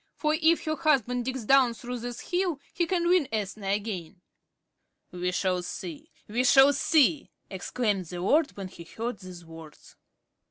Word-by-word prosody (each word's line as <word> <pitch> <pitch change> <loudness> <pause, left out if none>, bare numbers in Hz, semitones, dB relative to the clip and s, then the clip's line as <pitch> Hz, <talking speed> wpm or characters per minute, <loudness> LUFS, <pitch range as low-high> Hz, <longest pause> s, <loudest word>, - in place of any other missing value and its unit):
For 305 0 +1
if 325 +1 +3
her 310 0 0
husband 250 -6 +1
digs 260 -3 -4
down 260 -1 +4
through 245 +1 -6
this 240 +6 -7
hill, 355 -4 0
he 345 - 0
can 345 -1 0
win 355 -5 +3
Ethna 210 -2 -3
again." 195 -3 -3 0.9
"We 180 0 -2
shall 180 0 0
see! 175 -3 -7 0.2
We 235 +4 0
shall 270 +2 +6
see!" 295 0 +2 0.2
exclaimed 195 0 -2
the 175 +1 -6
lord 290 - +1
when 195 -2 -6
he 170 - -11
heard 225 +5 -5
these 180 -2 -11
words. 160 -2 -13
235 Hz, 160 wpm, -27 LUFS, 185-285 Hz, 0.9 s, shall